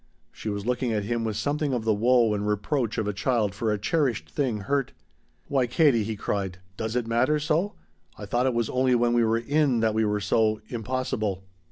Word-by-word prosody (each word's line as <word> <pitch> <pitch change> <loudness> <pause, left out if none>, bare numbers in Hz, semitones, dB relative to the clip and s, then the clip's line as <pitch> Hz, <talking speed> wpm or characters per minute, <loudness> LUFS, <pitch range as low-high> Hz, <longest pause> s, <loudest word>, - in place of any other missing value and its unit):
She 110 - -6
was 100 0 -4
looking 125 0 0
at 105 -2 0
him 115 +2 -1
with 110 -2 -2
something 145 +3 -1
of 120 - -2
the 110 - +3
woe 115 +1 +3
and 105 0 -2
reproach 115 +3 -1
of 110 -2 -1
a 105 - -1
child 105 -1 0
for 110 +2 -1
a 105 - 0
cherished 115 - -1
thing 120 - -1
hurt. 135 +4 -1 0.5
"Why, 130 -3 +1
Katie," 120 -3 +3
he 110 +1 -3
cried, 100 -3 -3 0.2
"does 110 +3 -3
it 125 -2 0
matter 120 +6 +2
so? 155 +7 0 0.4
I 105 - -7
thought 120 +5 +1
it 130 - 0
was 115 -2 +1
only 130 0 +2
when 120 0 +2
we 120 -1 +3
were 115 0 +2
in 135 +1 +1
that 110 -1 +2
we 110 +1 +1
were 105 -1 0
so 110 +2 +1
impossible." 110 -5 -2
115 Hz, 215 wpm, -26 LUFS, 105-130 Hz, 0.5 s, the